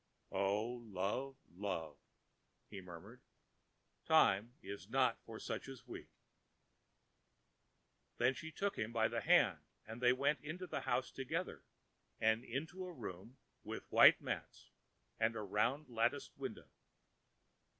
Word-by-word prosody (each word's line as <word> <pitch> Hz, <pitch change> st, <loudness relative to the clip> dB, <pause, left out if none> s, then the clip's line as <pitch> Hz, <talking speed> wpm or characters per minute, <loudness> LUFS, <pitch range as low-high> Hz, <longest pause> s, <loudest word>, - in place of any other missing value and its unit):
ãO 105 Hz, +5 st, 0 dB
love, 105 Hz, +9 st, -1 dB, 0.2 s
love,ã 90 Hz, -4 st, -3 dB, 0.8 s
he 100 Hz, -, -6 dB
murmured, 85 Hz, -3 st, -11 dB, 0.9 s
ãtime 100 Hz, +4 st, +5 dB
is 100 Hz, 0 st, -7 dB
not 130 Hz, -1 st, +3 dB
for 115 Hz, -1 st, -8 dB
such -, -, -4 dB
as 125 Hz, -2 st, -10 dB
we.ã 125 Hz, -, -8 dB, 2.1 s
Then 125 Hz, +2 st, +4 dB
she 160 Hz, +5 st, -7 dB
took 200 Hz, +4 st, -1 dB
him 105 Hz, +2 st, -1 dB
by 110 Hz, -1 st, +3 dB
the -, -, -2 dB
hand, -, -, +5 dB, 0.3 s
and 110 Hz, +2 st, -8 dB
they 125 Hz, 0 st, +6 dB
went 140 Hz, +4 st, +2 dB
into 170 Hz, +5 st, -5 dB
the -, -, -3 dB
house 125 Hz, +1 st, 0 dB
together 160 Hz, +7 st, -3 dB, 0.6 s
and 110 Hz, +1 st, +3 dB
into 155 Hz, +10 st, -4 dB
a -, -, -6 dB
room 115 Hz, -, -8 dB, 0.3 s
with -, -, -7 dB
white -, -, +9 dB
mats -, -, -5 dB, 0.5 s
and 115 Hz, +1 st, +2 dB
a 110 Hz, -, -3 dB
round 115 Hz, +9 st, +1 dB
latticed 115 Hz, -2 st, 0 dB
window. -, -, -6 dB
115 Hz, 130 wpm, -38 LUFS, 100-135 Hz, 2.1 s, white